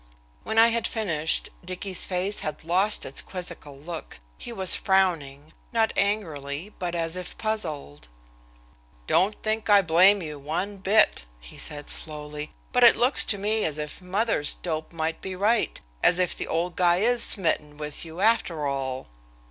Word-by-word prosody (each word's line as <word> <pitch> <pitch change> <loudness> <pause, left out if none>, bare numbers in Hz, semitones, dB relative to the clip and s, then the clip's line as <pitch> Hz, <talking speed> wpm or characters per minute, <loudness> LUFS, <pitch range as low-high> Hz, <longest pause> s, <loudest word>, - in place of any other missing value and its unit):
When 220 - -3
I 225 +1 +7
had 235 0 0
finished, 160 -8 0
Dicky's 185 +1 -1
face 190 +2 -2
had 155 0 -5
lost 185 +6 +2
its 135 - -4
quizzical 170 -6 -8
look. 165 +3 -8 0.2
He - - -7
was 190 -5 +2
frowning, 160 -7 0 0.2
not 225 -1 +1
angrily, 170 -4 -2
but 175 -2 -3
as 165 0 -1
if 180 -1 -7
puzzled. 155 - -4 1.0
"Don't 200 - +2
think 215 -1 -1
I 200 -1 +6
blame 185 +4 +5
you 150 -2 -7
one 175 +8 -3
bit," 195 - +3
he - - -12
said 145 -1 -5
slowly; 150 -1 -4 0.2
"but 250 -1 +3
it 235 - +8
looks 250 +3 +3
to 205 - 0
me 215 +2 0
as 155 -2 -1
if 150 +4 -6
mother's 185 -4 0
dope 155 -2 -4
might 160 -1 -3
be 190 -1 -5
right, 210 +4 +1 0.2
as 180 - +4
if 180 -1 +1
the - - -4
old 170 +2 -1
guy 175 -1 +4
is 235 +5 +3
smitten 150 -6 +3
with 150 -1 -4
you 165 +2 -8
after 200 -8 +2
all." 135 -2 -3
180 Hz, 165 wpm, -25 LUFS, 150-205 Hz, 1.0 s, it